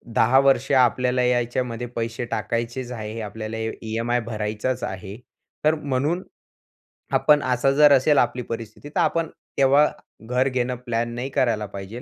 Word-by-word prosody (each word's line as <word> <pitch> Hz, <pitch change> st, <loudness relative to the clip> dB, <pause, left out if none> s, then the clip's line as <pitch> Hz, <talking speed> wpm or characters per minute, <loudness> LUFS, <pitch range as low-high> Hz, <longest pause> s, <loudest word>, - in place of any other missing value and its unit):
10 125 Hz, +4 st, +5 dB
वर्ष 135 Hz, -1 st, +3 dB
आपल्याला 125 Hz, -1 st, +3 dB
यायच्यामध्ये 120 Hz, -1 st, -1 dB
पैसे 115 Hz, +1 st, -3 dB
टाकायचेच 120 Hz, +1 st, -3 dB
आहे, 110 Hz, -1 st, -5 dB
आपल्याला 110 Hz, +1 st, -6 dB
ई 110 Hz, 0 st, -2 dB
ईएमआय 115 Hz, +2 st, -1 dB
भरायचाच 110 Hz, +2 st, -3 dB
आहे. 95 Hz, +2 st, -6 dB, 0.5 s
तर 155 Hz, +1 st, +4 dB
म्हणून 145 Hz, +4 st, -1 dB, 0.9 s
आपण 150 Hz, -1 st, +4 dB
असा 130 Hz, +1 st, +2 dB
जर 150 Hz, +1 st, +6 dB
असेल 140 Hz, +2 st, +4 dB
आपली 125 Hz, 0 st, +2 dB
परिस्थिती 115 Hz, +4 st, -7 dB
तर -, -, -2 dB
आपण 165 Hz, -1 st, +1 dB, 0.3 s
तेव्हा 140 Hz, +2 st, +5 dB, 0.4 s
घर 125 Hz, +4 st, 0 dB
घेणं 125 Hz, 0 st, -1 dB
प्लॅन 120 Hz, 0 st, -1 dB
नाही 125 Hz, +3 st, -4 dB
करायला 115 Hz, -5 st, +1 dB
पाहिजे. 100 Hz, +4 st, -8 dB
120 Hz, 145 wpm, -23 LUFS, 115-130 Hz, 0.9 s, जर